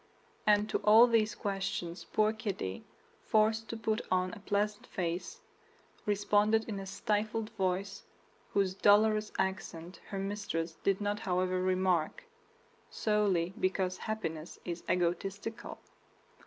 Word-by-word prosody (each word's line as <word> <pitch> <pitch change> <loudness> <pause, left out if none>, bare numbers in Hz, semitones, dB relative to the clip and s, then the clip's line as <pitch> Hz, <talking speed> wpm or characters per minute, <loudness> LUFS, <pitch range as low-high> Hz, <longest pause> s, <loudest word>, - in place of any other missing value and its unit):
And 210 0 +5
to - - +1
all 220 +3 +8
these 225 -3 +2
questions 195 -3 -3
poor 215 0 +2
Kitty, 200 - -4 0.4
forced 220 +1 +2
to 230 - -4
put 220 +1 0
on 185 +1 +1
a 230 - -8
pleasant 205 +1 -1
face, 180 - -3 0.7
responded 210 +2 +2
in 205 -3 -4
a 195 - -7
stifled 215 +3 -1
voice 195 -1 -2 0.5
whose 195 -2 +2
dolorous 215 +2 +4
accent 180 -2 -3
her 200 - -5
mistress 195 -4 -3
did 195 0 +1
not 205 0 -1
however 185 0 0
remark, 185 - +1 0.7
solely 200 -5 +1
because 185 -1 0
happiness 165 -7 -4
is 170 -1 -4
egotistical. 195 +6 -2
200 Hz, 120 wpm, -32 LUFS, 185-215 Hz, 0.7 s, all